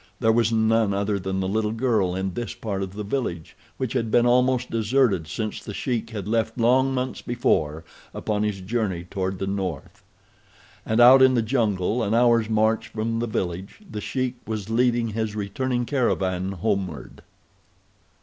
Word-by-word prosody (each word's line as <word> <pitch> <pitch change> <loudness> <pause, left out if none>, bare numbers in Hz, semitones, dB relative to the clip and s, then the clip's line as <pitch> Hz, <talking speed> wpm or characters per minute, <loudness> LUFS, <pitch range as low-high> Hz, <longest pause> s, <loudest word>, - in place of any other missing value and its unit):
There 110 -2 +3
was 115 0 +2
none 110 -2 +2
other 100 0 0
than 95 +1 -2
the 95 - -1
little 105 +2 0
girl 110 -7 +1
in 95 0 -2
this 120 +2 -5
part 105 -5 -4
of 95 -1 -4
the 105 +1 -5
village, 100 - -3 0.2
which 130 -4 -3
had 115 - -1
been 120 +2 +4
almost 125 +1 +2
deserted 115 - +1
since 110 +7 -4
The 105 - -7
Sheik 120 -4 -2
had 105 -4 -6
left 115 +1 0
long 130 +3 +3
months 130 -1 -3
before 80 -10 0 0.3
upon 105 -1 -2
his 105 -2 -1
journey 95 -3 -2
toward 95 +1 -3
the 95 - -3
north. 95 -6 -4 0.9
And 110 +1 +1
out 130 +2 +8
in 130 -1 +6
the 115 - +2
jungle, 110 -2 0
an 110 0 0
hour's 115 -2 +3
march 110 0 +1
from 115 +1 -2
the 120 - -1
village, 95 -2 -4
The 105 - -6
Sheik 130 +2 -2
was 110 -1 -4
leading 120 0 +2
his 110 -1 -3
returning 120 +5 -2
caravan 95 -8 0
homeward. 95 - -3
110 Hz, 170 wpm, -24 LUFS, 95-120 Hz, 0.9 s, out